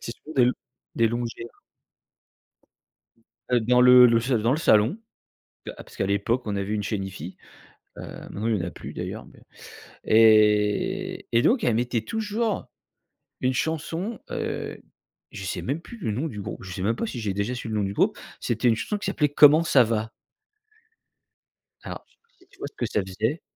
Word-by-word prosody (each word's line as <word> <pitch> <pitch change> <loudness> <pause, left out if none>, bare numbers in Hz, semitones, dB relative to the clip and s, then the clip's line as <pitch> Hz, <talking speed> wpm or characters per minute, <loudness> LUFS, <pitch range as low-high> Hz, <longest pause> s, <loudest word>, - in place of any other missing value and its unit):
C'est 115 - -5
surtout 155 - -13
des 125 -1 +5 0.4
des 115 -1 +3
longères. 120 0 -5 1.9
Heu, 125 -1 +3
dans 125 +2 +3
le 125 0 +9
le 115 -1 +4
s 120 +4 -3
dans 115 -1 +2
le 145 - 0
salon. 120 - +3 0.7
Que - - -5
a - - -17
parce - - -16
qu'à 95 - -1
l'époque 100 +5 0
on 105 -1 -2
avait 100 +1 -3
une 105 -1 -1
chaîne 100 -1 -2
hifi, 95 -2 -8 0.6
heu, - - -7
maintenant 110 +3 -6
il 115 -2 +2
y - - -2
en - - -3
a - - -6
plus - - -9
d'ailleurs, - - -6
mais - - -18 0.7
et 110 - +3
et 115 - +4
donc 240 - +2
elle 120 - +2
mettait 120 -1 0
toujours 220 - -2 0.7
une 130 0 +1
chanson. 165 - -2
Heu, - - -4 0.5
je 95 - -7
sais 95 - -4
même 140 +6 -2
plus 235 - -11
le 150 - -3
nom 135 +9 -2
du 105 -7 -7
grou - - -6
je 95 - -8
sais 90 - -5
même 110 +4 +1
pas 230 - -2
si 125 - -5
j'ai 105 -2 -2
déjà 100 +5 -2
su 120 - -6
le 110 - -3
nom 105 - +1
du 95 - -3
groupe. - - +1 0.2
C'était 125 - 0
une 115 - +3
chanson 210 - -3
qui 200 - -6
s'appelait 150 -6 +1
comment 150 +2 +7
ça 135 -7 +5
va. 110 0 -2 1.7
Alors - - -8 0.5
tu - - -23
vois - - -5
ce - - -27
que - - -1
ça - - 0
faisait 110 - -2
115 Hz, 195 wpm, -25 LUFS, 105-150 Hz, 1.9 s, le